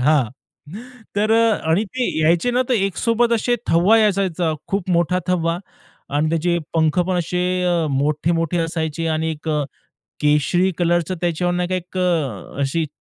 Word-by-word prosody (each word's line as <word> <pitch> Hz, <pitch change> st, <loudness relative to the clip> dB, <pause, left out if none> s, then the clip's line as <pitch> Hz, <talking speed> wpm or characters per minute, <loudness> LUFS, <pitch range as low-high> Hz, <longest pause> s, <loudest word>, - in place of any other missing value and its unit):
हां. 135 Hz, -3 st, +3 dB, 0.9 s
तर 215 Hz, +2 st, +2 dB
अ, 230 Hz, 0 st, +4 dB, 0.2 s
आणि 190 Hz, +7 st, +2 dB
ते 250 Hz, +4 st, -3 dB
यायचे 165 Hz, +9 st, +3 dB
ना, 250 Hz, +1 st, +2 dB
तर 255 Hz, -, +2 dB
एकसोबत 230 Hz, +4 st, +1 dB
असे 240 Hz, +1 st, +1 dB
थवा 180 Hz, +7 st, +5 dB
यायचा, 205 Hz, -3 st, +3 dB
त्याचा 175 Hz, -3 st, -1 dB, 0.2 s
खूप 195 Hz, -2 st, -2 dB
मोठा 175 Hz, +1 st, +2 dB
थवा. 170 Hz, -1 st, 0 dB, 0.5 s
आणि 150 Hz, +2 st, +1 dB
त्याचे 170 Hz, +1 st, +1 dB, 0.2 s
पंख 160 Hz, 0 st, +2 dB
पण 185 Hz, -, 0 dB
असे 180 Hz, +1 st, -1 dB, 0.2 s
अ, 175 Hz, -2 st, +1 dB
मोठे-मोठे 155 Hz, +5 st, 0 dB
असायचे, 165 Hz, -1 st, -2 dB
आणि 160 Hz, 0 st, 0 dB
एक 155 Hz, 0 st, -7 dB
अ, 150 Hz, -1 st, +1 dB, 0.6 s
केशरी 150 Hz, +5 st, +2 dB
कलरचं 175 Hz, 0 st, +1 dB
त्याच्यावरून 175 Hz, +1 st, 0 dB
एक 185 Hz, 0 st, -4 dB
अ, 155 Hz, -, -1 dB
अशी 150 Hz, +4 st, 0 dB
170 Hz, 150 wpm, -20 LUFS, 160-185 Hz, 0.9 s, थवा